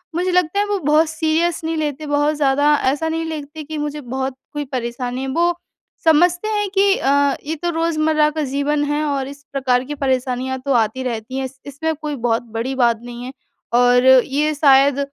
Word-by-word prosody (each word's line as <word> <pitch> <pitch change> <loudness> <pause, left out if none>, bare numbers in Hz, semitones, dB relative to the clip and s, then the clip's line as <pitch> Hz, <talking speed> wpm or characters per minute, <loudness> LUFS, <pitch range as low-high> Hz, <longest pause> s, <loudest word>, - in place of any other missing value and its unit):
मुझे 360 +2 0
लगता 360 +1 +1
है, 410 - +2
वो 410 -1 -1
बहुत 305 +1 +3
सीरियस 320 +1 0
नहीं 325 +1 -2
लेते 300 -1 -3
बहुत 290 +1 +1
ज़्यादा, 285 0 +2 0.2
ऐसा 310 +3 -2
नहीं 325 0 -2
लेते 310 -1 -6
कि 310 +1 -6
मुझे 295 0 -4
बहुत 265 +1 -4 0.2
कोई 295 0 -3
परेशानी 250 -1 -4
है। 270 - -3
वो 340 +6 +1 0.5
समझते 350 +5 +3
हैं 415 -2 -1
कि 395 0 +5
अ, 270 - -1 0.4
"ये 315 +2 -2
तो 345 +3 -3
रोज़मर्रा 315 -2 +1
का - - +1
जीवन 290 +1 0
है 300 +1 0
और 275 -2 -1
इस 280 +1 -11
प्रकार 255 -2 +1
की 295 +3 -6
परेशानियाँ 260 -1 -1
तो 275 - +1
आती 240 +5 -5
रहती 240 +1 -4
हैं, 270 - -2
इस 265 +1 -10
इसमें 320 +3 -3
कोई 300 0 -5
बहुत 235 -2 0
बड़ी 255 +4 -2
बात 235 -3 +2
नहीं 240 0 -8
है। 255 - -6 0.4
और 245 +1 +4
ये 275 +4 +4
शायद 280 -1 +4
290 Hz, 200 wpm, -19 LUFS, 260-315 Hz, 0.5 s, कि